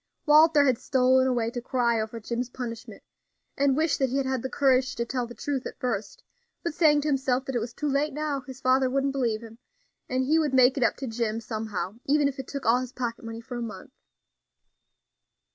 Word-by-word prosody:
Walter 305 -1 +6
had 255 -4 +2
stolen 260 0 +3
away 235 -3 0
to 245 - -4
cry 235 -2 +1
over 220 +1 -5
Jim's 235 +3 -3
punishment, 240 -2 -7 0.5
and 275 -1 +2
wish 315 -1 +2
that 265 -2 +1
he 265 - -1
had 275 - 0
had 260 -2 -1
the 260 - -4
courage 265 -2 +2
to 235 - -2
tell 245 0 -2
the 240 - -11
truth 275 -3 -3
at - - -10
first; 220 -5 -3 0.4
but 340 - -2
saying 305 -3 +4
to 300 - -3
himself 265 -2 +1
that 270 - -4
it - - +2
was 235 +1 -4
too 300 +5 -4
late 285 +2 +1
now, 295 -1 -2
his 260 -1 -9
father 260 0 +3
wouldn't 275 +1 0
believe 235 -5 0
him, 225 0 -12 0.5
and 255 +1 0
he 310 +4 +3
would 295 -4 0
make 255 0 +5
it 275 - -2
up 240 - +3
to 270 - -5
Jim 225 -1 -2
somehow, 215 -2 -4
even 290 +1 +3
if 275 -1 -5
it 265 - -6
took 280 -1 -6
all 235 +2 +4
his 255 -1 -5
pocket 240 -2 -4
money 225 0 -7
for 245 +1 -7
a - - -4
month. 225 +2 -7
255 Hz, 225 wpm, -26 LUFS, 235-275 Hz, 0.5 s, Walter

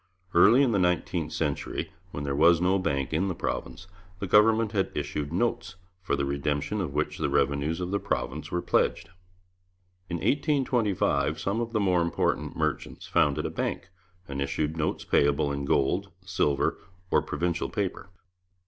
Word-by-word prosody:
Early 110 +10 +6
in 130 - +2
the 100 - +2
nineteenth 90 -3 0
century, 75 -4 -2 0.2
when 70 -4 -6
there 70 -1 -2
was 85 +3 +5
no 95 +2 +2
bank 70 -6 -1
in 85 +5 +1
the 95 - -2
province, 90 - -4 0.3
the 100 - -4
government 110 +3 +4
had 100 -3 0
issued 75 0 -3
notes, 90 -2 -1 0.3
for 95 - 0
the 70 0 -1
redemption 70 +7 -1
of 85 -7 -3
which 75 - -1
the - - 0
revenues 70 +3 +1
of 90 0 -3
the 100 - +1
province 75 +3 -3
were 90 - -2
pledged. 85 - +1 1.0
In 85 - -2
1825 125 - +1
some 100 +4 -1
of 115 -1 -3
the 110 - 0
more 90 -4 +2
important 85 0 -1
merchants - - -2
founded 70 -2 +1
a - - -2
bank, - - -3 0.4
and 70 0 -4
issued 75 +3 -1
notes 80 -2 -2
payable 70 0 +2
in 70 0 -3
gold, 90 +9 +1 0.2
silver, 75 -7 0 0.3
or - - +4
provincial 85 -1 -2
paper. 95 -3 -3
85 Hz, 165 wpm, -27 LUFS, 70-100 Hz, 1.0 s, Early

